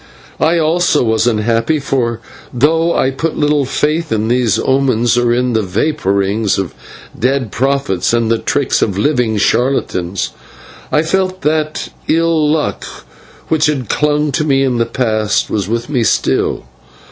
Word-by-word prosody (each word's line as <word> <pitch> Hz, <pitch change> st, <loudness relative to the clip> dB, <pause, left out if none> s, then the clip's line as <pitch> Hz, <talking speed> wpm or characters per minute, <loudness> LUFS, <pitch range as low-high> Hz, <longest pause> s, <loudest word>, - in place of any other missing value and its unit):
I, 170 Hz, +2 st, +2 dB
also, 165 Hz, -1 st, +2 dB
was 110 Hz, 0 st, +1 dB
unhappy, 115 Hz, +6 st, +1 dB
for 120 Hz, -5 st, -1 dB, 0.3 s
though 160 Hz, +6 st, +2 dB
I 130 Hz, -, +1 dB
put 155 Hz, +4 st, -3 dB
little 150 Hz, -1 st, +2 dB
faith 155 Hz, +4 st, -1 dB
in 110 Hz, 0 st, 0 dB
these 120 Hz, -4 st, +2 dB
omens, 130 Hz, -3 st, +1 dB
or 120 Hz, -1 st, +2 dB
in 125 Hz, 0 st, +1 dB
the 110 Hz, -, +2 dB
vapourings 100 Hz, -1 st, 0 dB
of 95 Hz, -3 st, -3 dB, 0.4 s
dead 130 Hz, -2 st, -1 dB
prophets 135 Hz, -7 st, 0 dB
and 115 Hz, -1 st, +1 dB
the 115 Hz, -, +1 dB
tricks 140 Hz, -3 st, 0 dB
of 100 Hz, -3 st, 0 dB
living 120 Hz, -2 st, +1 dB
charlatans, 100 Hz, -6 st, 0 dB, 0.6 s
I 150 Hz, -, +2 dB
felt 185 Hz, +2 st, -1 dB
that 155 Hz, 0 st, -1 dB, 0.2 s
the -, -, +3 dB
ill 165 Hz, -2 st, +2 dB
luck 155 Hz, -1 st, -1 dB, 0.7 s
which 160 Hz, -1 st, +2 dB
had 135 Hz, -7 st, -2 dB
clung 150 Hz, 0 st, +1 dB
to 140 Hz, -, 0 dB
me 135 Hz, -3 st, +2 dB
in 125 Hz, -3 st, 0 dB
the 115 Hz, -, +1 dB
past 110 Hz, -4 st, 0 dB
was 100 Hz, -3 st, -1 dB
with 115 Hz, +2 st, -2 dB
me 130 Hz, -5 st, 0 dB
still. -, -, 0 dB
130 Hz, 155 wpm, -15 LUFS, 110-150 Hz, 0.7 s, the